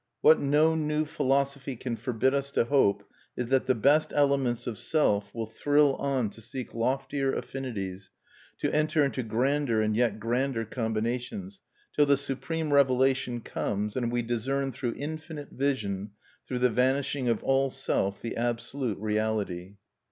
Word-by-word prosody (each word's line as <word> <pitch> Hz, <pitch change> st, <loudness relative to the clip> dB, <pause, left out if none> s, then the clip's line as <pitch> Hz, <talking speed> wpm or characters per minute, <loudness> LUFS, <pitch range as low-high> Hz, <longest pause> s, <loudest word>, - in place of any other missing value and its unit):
What 155 Hz, -, +7 dB
no 150 Hz, +3 st, +3 dB
new 155 Hz, -1 st, 0 dB
philosophy 140 Hz, -2 st, 0 dB
can 120 Hz, 0 st, -4 dB
forbid 125 Hz, +3 st, 0 dB
us 140 Hz, 0 st, -1 dB
to -, -, +2 dB
hope 125 Hz, -6 st, +2 dB, 0.3 s
is 125 Hz, -1 st, -2 dB
that 130 Hz, -1 st, +2 dB
the 130 Hz, -, +3 dB
best 145 Hz, +7 st, +3 dB
elements 140 Hz, -4 st, +2 dB
of 115 Hz, -3 st, -4 dB
Self 105 Hz, -10 st, +1 dB
will 115 Hz, -1 st, -4 dB
thrill 145 Hz, +5 st, +3 dB
on 130 Hz, -6 st, 0 dB
to 115 Hz, -, -9 dB
seek 125 Hz, +3 st, -7 dB
loftier 135 Hz, +3 st, 0 dB
affinities, 100 Hz, -8 st, -5 dB, 0.5 s
to -, -, -1 dB
enter 155 Hz, 0 st, +2 dB
into 135 Hz, -2 st, -1 dB
grander 125 Hz, +2 st, +1 dB
and 110 Hz, 0 st, +1 dB
yet 115 Hz, -2 st, +1 dB
grander 120 Hz, +1 st, -1 dB
combinations, 120 Hz, -, -3 dB, 0.4 s
till 145 Hz, -, +4 dB
the 140 Hz, -1 st, +5 dB
supreme 145 Hz, +3 st, -2 dB
revelation 130 Hz, -2 st, +3 dB
comes, 105 Hz, -1 st, -3 dB
and 120 Hz, -2 st, -1 dB
we 120 Hz, 0 st, 0 dB
discern, 135 Hz, +4 st, -1 dB
through 120 Hz, -1 st, -3 dB
infinite 155 Hz, 0 st, -6 dB
vision, 105 Hz, -8 st, -2 dB, 0.3 s
through 125 Hz, -, -2 dB
the 125 Hz, 0 st, +3 dB
vanishing 130 Hz, +2 st, +1 dB
of 115 Hz, -2 st, 0 dB
all 135 Hz, 0 st, +2 dB
Self, 100 Hz, -7 st, -1 dB
the 115 Hz, -, -3 dB
Absolute 120 Hz, 0 st, -2 dB
Reality. 105 Hz, -3 st, -2 dB
130 Hz, 150 wpm, -28 LUFS, 115-140 Hz, 0.5 s, What